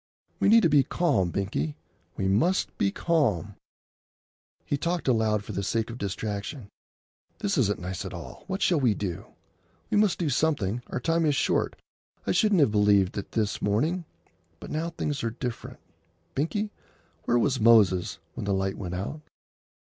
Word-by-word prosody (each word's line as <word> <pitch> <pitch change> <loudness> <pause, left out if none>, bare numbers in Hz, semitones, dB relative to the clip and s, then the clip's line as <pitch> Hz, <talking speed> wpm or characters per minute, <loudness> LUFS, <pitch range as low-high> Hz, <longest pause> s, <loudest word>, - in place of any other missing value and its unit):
"We - - +3
need 225 +1 +7
to - - +6
be 145 -1 +6
calm, 135 - +1
Binkie; 85 -6 -2 0.4
we 95 - 0
must 120 - +1
be 100 - +3
calm." 110 - 0 1.1
He - - 0
talked 170 +3 -2
aloud 110 -4 +2
for - - -7
the 100 - -2
sake 115 +3 -1
of 120 - -8
distraction. 100 +3 -4 0.7
"This 205 -1 -1
isn't 105 - +2
nice 90 -1 -5
at - - -6
all. - - -9
What 195 +1 -2
shall 170 -4 +3
we 120 -6 +3
do? 90 -5 -4 0.6
We - - +3
must 210 -3 +3
do 170 - -1
something. 125 -7 0
Our - - -3
time 165 +5 +1
is 145 - +2
short. - - +1 0.5
I - - +1
shouldn't 210 -6 +3
have 140 - +4
believed 105 -3 +4
that 100 - -6
this 105 -2 -1
morning; 155 - 0 0.5
but - - -9
now 160 +2 -1
things 150 -5 -3
are 115 - +1
different. 120 0 -6 0.6
Binkie, 205 +9 -1 0.5
where 120 - +3
was 130 +2 +1
Moses 105 -6 +4 0.2
when - - -5
the 100 -1 +1
light 95 0 -2
went 90 -2 -4
out?" 100 +12 -4
115 Hz, 170 wpm, -27 LUFS, 100-160 Hz, 1.1 s, need